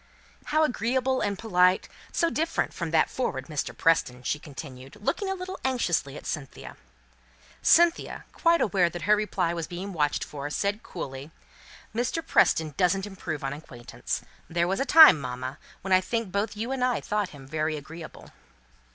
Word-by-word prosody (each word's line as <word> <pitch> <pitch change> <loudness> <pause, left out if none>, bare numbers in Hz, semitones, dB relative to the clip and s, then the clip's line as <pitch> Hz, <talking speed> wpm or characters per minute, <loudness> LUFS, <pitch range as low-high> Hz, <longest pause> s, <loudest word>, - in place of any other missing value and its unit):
How 310 +1 +2
agreeable 260 0 0
and 200 -1 -1
polite! 185 -3 +3 0.2
So 335 -1 +1
different 325 +2 -1
from 170 -2 -4
that 160 -1 +3
forward 135 - -3
Mr. 150 -2 -4
Preston," 125 -6 +2
she 150 - -1
continued, 135 -3 -10
looking 385 - -1
a 385 - -1
little 370 0 -6
anxiously 175 - 0
at - - -11
Cynthia. 140 -4 -6 0.9
Cynthia, 340 0 +3
quite 335 0 +3
aware 190 -4 +3
that 175 -1 -7
her 210 +4 +5
reply 190 -5 -1
was 165 -2 -4
being 190 +3 -6
watched 150 -3 0
for, 145 0 -6
said, 200 +7 -1
coolly, 135 - -7 0.6
"Mr. 245 +8 -1
Preston 155 -2 +3
doesn't 190 +2 +2
improve 185 -7 -6
on 135 0 -2
acquaintance. 135 -5 -6 0.3
There 170 +1 +1
was 190 +2 -1
a 270 - +1
time, 315 - +9
mamma, 130 +2 -5 0.2
when 190 0 0
I 185 - +6
think 230 -1 -2
both 205 +2 -2
you 230 +4 -3
and 265 -2 -1
I 250 -1 +2
thought 210 -2 -1
him 140 -2 -12
very 155 +1 -1
agreeable." 160 +3 -10
180 Hz, 170 wpm, -27 LUFS, 150-230 Hz, 0.9 s, time